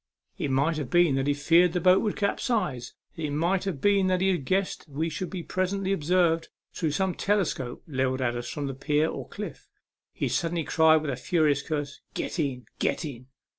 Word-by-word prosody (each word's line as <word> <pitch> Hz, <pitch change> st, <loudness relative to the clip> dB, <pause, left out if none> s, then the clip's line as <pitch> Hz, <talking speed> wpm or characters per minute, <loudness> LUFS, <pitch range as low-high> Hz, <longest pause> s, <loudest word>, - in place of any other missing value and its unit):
It 145 Hz, -, -1 dB
might 140 Hz, +5 st, +1 dB
have 145 Hz, -5 st, -4 dB
been 175 Hz, -4 st, +4 dB
that 135 Hz, +1 st, 0 dB
he 145 Hz, -, +2 dB
feared 165 Hz, +4 st, +4 dB
the 180 Hz, -, +1 dB
boat 185 Hz, +2 st, +5 dB
would 210 Hz, -, -1 dB
capsize, 200 Hz, -, -1 dB, 0.2 s
and 165 Hz, -, -6 dB
it 150 Hz, -, -1 dB
might 170 Hz, +6 st, 0 dB
have 185 Hz, -8 st, -3 dB
been 200 Hz, +2 st, +3 dB
that 185 Hz, -1 st, +2 dB
he 190 Hz, 0 st, +3 dB
guessed 185 Hz, +8 st, -1 dB
we 155 Hz, +4 st, -2 dB
should 180 Hz, +3 st, -4 dB
be 185 Hz, -3 st, -5 dB
presently 190 Hz, +2 st, -1 dB
observed 165 Hz, -1 st, +2 dB, 0.2 s
through 160 Hz, -, -1 dB
some 190 Hz, +5 st, 0 dB
telescope 180 Hz, -13 st, -1 dB
levelled 130 Hz, -3 st, 0 dB
at 120 Hz, -2 st, 0 dB
us 120 Hz, 0 st, -4 dB
from 145 Hz, -, -4 dB
the 135 Hz, -, -3 dB
pier 150 Hz, +3 st, +1 dB
or -, -, -6 dB
cliif. -, -, -7 dB, 0.4 s
He -, -, -2 dB
suddenly 165 Hz, -1 st, -1 dB
cried 160 Hz, 0 st, +4 dB
with 150 Hz, -, -2 dB
a -, -, -2 dB
furious 150 Hz, -2 st, +1 dB
curse, 145 Hz, -1 st, -4 dB
" -, -, -43 dB
Get -, -, -3 dB
in, 130 Hz, -5 st, -2 dB
get -, -, 0 dB
in 130 Hz, -4 st, -8 dB
160 Hz, 210 wpm, -27 LUFS, 140-185 Hz, 0.4 s, boat